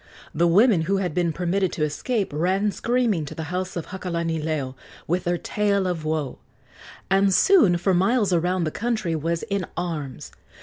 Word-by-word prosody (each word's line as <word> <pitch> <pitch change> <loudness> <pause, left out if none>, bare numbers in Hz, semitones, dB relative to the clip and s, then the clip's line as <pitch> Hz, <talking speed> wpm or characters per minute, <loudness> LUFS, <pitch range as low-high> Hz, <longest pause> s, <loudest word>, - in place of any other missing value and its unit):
The 170 +3 +2
women 200 +1 +5
who 195 - +2
had 180 -4 -2
been 175 -1 +1
permitted 180 +3 0
to 155 - -1
escape 195 - -2
ran 190 +7 +1
screaming 230 -7 0
to - - -8
the 160 - -4
house 185 +1 -3
of 170 - -5
Hakalanileo 160 -6 -2 0.3
with 175 +3 -1
their 175 0 +1
tale 200 +1 0
of 175 -4 -2
woe, 155 -4 -2 0.7
and 195 0 +4
soon 210 - +5
for 185 +2 +1
miles 195 +2 +2
around 175 +1 +1
the 155 - -1
country 220 -7 -1
was 165 +2 -2
in 200 -1 -2
arms. 155 -7 -4
180 Hz, 170 wpm, -24 LUFS, 165-195 Hz, 0.7 s, women